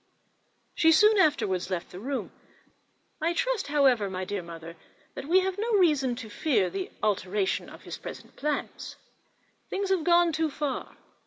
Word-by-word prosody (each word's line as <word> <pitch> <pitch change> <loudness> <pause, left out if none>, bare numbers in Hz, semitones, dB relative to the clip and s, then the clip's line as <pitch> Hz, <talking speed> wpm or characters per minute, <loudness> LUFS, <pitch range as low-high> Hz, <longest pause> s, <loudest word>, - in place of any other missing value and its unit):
She 325 - +4
soon 425 +6 +6
afterwards 200 - +2
left 180 -2 -4
the 180 - -8
room. 270 +5 -4 0.9
I 330 +2 +1
trust, - - 0
however, 265 -8 +3
my 185 0 -4
dear 200 0 -3
mother, 170 -1 -9 0.4
that - - -7
we 370 +2 +5
have 380 +1 -2
no 455 +2 -1
reason 300 - +3
to 235 -2 -8
fear 215 - +1
an 385 -1 -3 0.2
alteration 195 -1 0
of - - -13
his - - -7
present - - -9
plan; 300 0 -1 1.0
things 395 0 -2
have 370 -4 +2
gone 345 0 +4
too 320 0 0
far. 285 -2 -4
290 Hz, 160 wpm, -27 LUFS, -, 1.0 s, soon